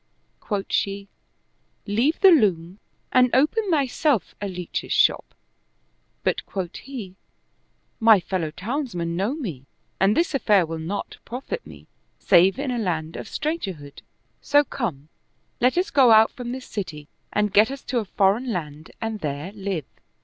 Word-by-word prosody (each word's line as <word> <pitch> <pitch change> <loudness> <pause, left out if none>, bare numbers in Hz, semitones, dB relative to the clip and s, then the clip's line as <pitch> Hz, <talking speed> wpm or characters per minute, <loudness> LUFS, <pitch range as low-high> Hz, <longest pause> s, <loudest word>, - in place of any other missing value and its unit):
Quoth 200 -3 -3
she, 200 0 -1 0.4
" - - -45
Leave 235 +10 +1
the 385 -2 +8
loom 190 - +2 0.3
and 250 0 +5
open 375 - +2
thyself 285 - +1
a 205 - -2
leach's 180 -2 -5
shop - - +2 0.4
"; - - -45
but - - 0
quoth 185 -3 -5
he, 220 -9 -8 0.4
" - - -45
My 215 -3 +9
fellow 175 -3 -2
townsmen 185 - -3
know 200 +10 -1
me 165 - -6 0.3
and 195 +3 +3
this 335 -2 +1
affair 210 -9 +3
will 165 0 -5
not 175 +6 -5
profit 270 - -6
me, - - -13 0.3
save 185 +5 +4
in 275 -1 -2
a 245 - -1
land 165 -6 -2
of - - -6
stranger 305 - -2
hood; 145 -3 -13 0.4
so 290 0 +4
come, 160 - -5 0.5
let 250 +6 +2
us 365 +2 +1
go 270 -4 +5
out 220 0 +6
from 245 -3 -6
this 255 0 -6
city 155 -8 -6 0.2
and 210 -1 0
get 210 +3 +6
us 275 0 -7
to 245 -1 -1
a 220 - -4
foreign 205 +6 +1
land 155 -4 -5
and 225 -1 -3
there 150 +2 -4
live." 195 -7 -4
205 Hz, 165 wpm, -24 LUFS, 175-255 Hz, 0.5 s, My